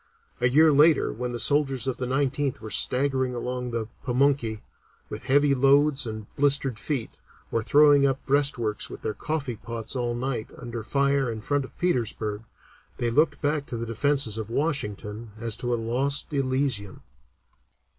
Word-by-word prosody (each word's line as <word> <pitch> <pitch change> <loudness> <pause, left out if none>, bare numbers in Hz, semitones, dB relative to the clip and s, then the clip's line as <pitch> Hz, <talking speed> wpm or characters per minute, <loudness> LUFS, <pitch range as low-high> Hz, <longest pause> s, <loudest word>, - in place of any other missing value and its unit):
A 125 - +3
year 155 +4 +5
later, 150 +2 +4
when 125 +2 -4
the 120 - -4
soldiers 135 +2 +1
of 130 -2 -2
the 125 - -3
Nineteenth 140 0 -1
were 110 -1 -8
staggering 130 +1 +2
along 125 +1 -4
the 115 -2 -3 0.2
Pamunkey, 125 -4 +1 0.5
with 105 +4 -7
heavy 140 +2 +3
loads 140 0 +3
and 110 -1 -6
blistered 140 -4 +1
feet, 130 -1 -4 0.3
or 115 - 0
throwing 145 +3 +5
up 135 0 -2
breastworks 135 -6 0
with - - -10
their 110 - -2
coffee 140 -6 -3
pots 115 +2 -5
all 120 -2 -1
night 120 -2 -3
under 120 -1 -6
fire 140 +1 +1
in 110 - -5
front 145 +5 -1
of - - -16
Petersburg, 110 -10 -1 0.6
they 120 -1 -1
looked 150 +4 +1
back 145 0 0
to 120 - -4
the 115 - -4
Defences 115 -1 0
of 110 0 -5
Washington 110 -6 -3
as 115 -2 0
to 120 - -2
a - - +2
lost 130 +7 +1
Elysium." 130 -7 -1
130 Hz, 165 wpm, -26 LUFS, 115-140 Hz, 0.6 s, year